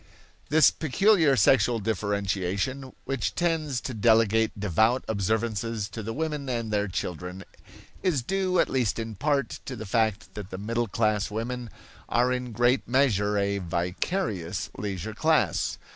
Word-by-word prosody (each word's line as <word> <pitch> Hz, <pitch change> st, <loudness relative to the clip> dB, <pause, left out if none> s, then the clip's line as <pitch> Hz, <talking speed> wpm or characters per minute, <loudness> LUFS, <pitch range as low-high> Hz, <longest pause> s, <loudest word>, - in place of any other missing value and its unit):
This 155 Hz, +2 st, +6 dB
peculiar 160 Hz, -1 st, +3 dB
sexual 120 Hz, +1 st, +4 dB
differentiation, 100 Hz, +4 st, -2 dB
which 135 Hz, -5 st, -2 dB
tends 160 Hz, -6 st, 0 dB
to 130 Hz, -, -5 dB
delegate 110 Hz, -1 st, +3 dB
devout 110 Hz, +6 st, +2 dB
observances 110 Hz, +1 st, -1 dB
to 115 Hz, -, -6 dB
the 110 Hz, +2 st, -4 dB
women 150 Hz, 0 st, -3 dB
and 115 Hz, -3 st, -2 dB
their 105 Hz, 0 st, +1 dB
children, 90 Hz, +1 st, -5 dB, 0.6 s
is 170 Hz, -10 st, +1 dB
due, 190 Hz, +4 st, 0 dB
at -, -, +4 dB
least 125 Hz, -6 st, 0 dB
in 115 Hz, -1 st, -4 dB
part, 140 Hz, +2 st, -1 dB
to 130 Hz, -, -5 dB
the 110 Hz, -2 st, -7 dB
fact 110 Hz, 0 st, 0 dB
that 105 Hz, -2 st, -7 dB
the 95 Hz, -, -6 dB
middle 115 Hz, +4 st, -1 dB
class 105 Hz, -1 st, 0 dB
women 120 Hz, +2 st, -4 dB, 0.4 s
are 125 Hz, +1 st, +2 dB
in 125 Hz, -1 st, -3 dB
great 120 Hz, +3 st, +2 dB
measure 105 Hz, -6 st, +2 dB
a 100 Hz, 0 st, 0 dB
(vicarious) 90 Hz, -, -2 dB
leisure 100 Hz, 0 st, -4 dB
class. 160 Hz, +7 st, +1 dB
115 Hz, 145 wpm, -27 LUFS, 100-130 Hz, 0.6 s, This